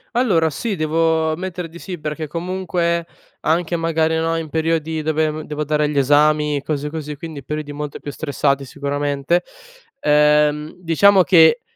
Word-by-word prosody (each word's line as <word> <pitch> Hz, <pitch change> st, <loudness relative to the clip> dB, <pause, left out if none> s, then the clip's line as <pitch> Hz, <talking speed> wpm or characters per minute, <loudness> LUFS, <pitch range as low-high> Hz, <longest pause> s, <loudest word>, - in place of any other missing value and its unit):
Allora 185 Hz, -10 st, +3 dB
sì, 210 Hz, +8 st, -3 dB
devo 160 Hz, 0 st, +1 dB
ammettere 180 Hz, 0 st, -5 dB
di 170 Hz, +2 st, -12 dB
sì, 180 Hz, -2 st, -6 dB
perché 155 Hz, +1 st, -4 dB
comunque 170 Hz, 0 st, -2 dB, 0.3 s
anche, 170 Hz, +2 st, 0 dB
magari, 160 Hz, -1 st, +1 dB
no, 165 Hz, 0 st, 0 dB
in 160 Hz, -2 st, -4 dB
periodi 160 Hz, 0 st, -1 dB
dove, 155 Hz, 0 st, 0 dB
mhmm, 155 Hz, +1 st, -6 dB
devo 150 Hz, 0 st, -4 dB
dare 150 Hz, 0 st, +1 dB
gli 145 Hz, -1 st, -3 dB
esami, 150 Hz, +1 st, +3 dB
cose 150 Hz, -1 st, -2 dB
così, 150 Hz, -1 st, -6 dB
quindi 150 Hz, -2 st, -8 dB
periodi 150 Hz, 0 st, -4 dB
molto 145 Hz, 0 st, -5 dB
più 145 Hz, -, -7 dB
stressati 140 Hz, -2 st, -1 dB
sicuramente, 145 Hz, +4 st, -1 dB, 0.6 s
ehm, 150 Hz, 0 st, +3 dB
diciamo 185 Hz, +3 st, +4 dB
che 170 Hz, +6 st, +5 dB
155 Hz, 155 wpm, -20 LUFS, 150-165 Hz, 0.6 s, che